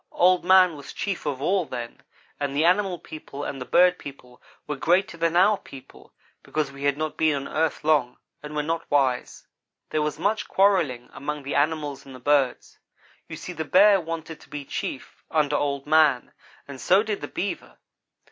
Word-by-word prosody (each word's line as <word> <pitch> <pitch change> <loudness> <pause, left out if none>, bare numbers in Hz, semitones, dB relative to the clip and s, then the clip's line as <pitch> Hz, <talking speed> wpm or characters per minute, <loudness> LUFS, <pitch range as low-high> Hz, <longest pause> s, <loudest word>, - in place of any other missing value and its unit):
Old 180 0 +3
man 185 -2 +5
was 140 -2 -10
chief 195 -6 -4
of 140 -2 -3
all 190 +3 +2
then, 120 -5 -7 0.4
and 140 -1 -2
the 155 +3 +2
animal 185 +1 +2
people 150 -3 -9
and 135 -2 -5
the - - -4
bird 180 +1 +4
people 125 -3 -12 0.2
were 150 - -3
greater 175 +7 +1
than 165 0 0
our 195 +3 +4
people, 135 -2 -14 0.3
because 150 -3 -3
we 140 +1 -7
had 140 0 +2
not 155 0 -3
been 155 -2 +2
on 140 0 -4
earth 160 -1 -1
long 150 -5 +2 0.2
and 150 0 -8
were 150 - 0
not 165 +2 -3
wise. 135 -3 0 0.5
"There 155 - 0
was 150 0 -2
much 210 +2 -1
quarrelling 175 -11 +1
among 145 +1 -5
the 140 - -4
animals 145 -2 -1
and 135 -1 -12
the - - -11
birds. 135 -1 0 0.5
You - - -6
see 180 - -7
the 160 - -4
Bear 195 +4 +5
wanted 165 -1 -6
to - - -18
be 145 -1 -6
chief, - - -6
under 150 -2 +1
Old 140 -1 -1
man, 150 -4 +3 0.4
and 140 -2 -9
so 195 +3 +4
did 215 -2 -3
the - - -5
Beaver. 200 - -5
150 Hz, 190 wpm, -25 LUFS, 140-175 Hz, 0.5 s, man